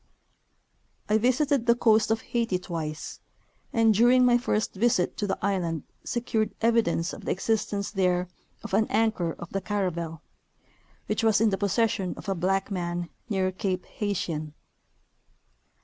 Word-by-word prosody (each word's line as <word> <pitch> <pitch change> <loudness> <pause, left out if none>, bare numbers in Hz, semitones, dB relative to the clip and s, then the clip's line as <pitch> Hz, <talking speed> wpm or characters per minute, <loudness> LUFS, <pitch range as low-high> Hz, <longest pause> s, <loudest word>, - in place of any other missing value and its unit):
I 215 +1 +4
visited 255 +1 +2
the 235 - +6
coast 220 -3 +3
of 225 0 +1
Haiti 230 -6 -1
twice, 160 -4 -5 0.5
and 225 -1 +4
during 245 +4 +5
my 245 -1 +5
first 220 -3 0
visit 200 -3 +1
to 205 - -1
the 195 - -1
island 170 -6 -1 0.2
secured 220 -3 -1
evidence 225 -7 +2
of - - -9
the - - 0
existence 205 0 -1
there 180 -3 +1 0.4
of - - -8
an 215 +2 +3
anchor 215 -6 +1
of 175 - -10
the 195 - -2
caravel, 170 -6 -3 0.8
which - - -1
was 220 -3 +4
in 220 -1 +3
the 195 - 0
possession 200 -2 0
of - - -10
a 195 - +1
blacic 190 +3 0
man 175 -2 -3 0.2
near 190 -3 +1
cape 185 -1 -2
Haitien. 165 -7 -3
200 Hz, 150 wpm, -27 LUFS, 180-225 Hz, 0.8 s, the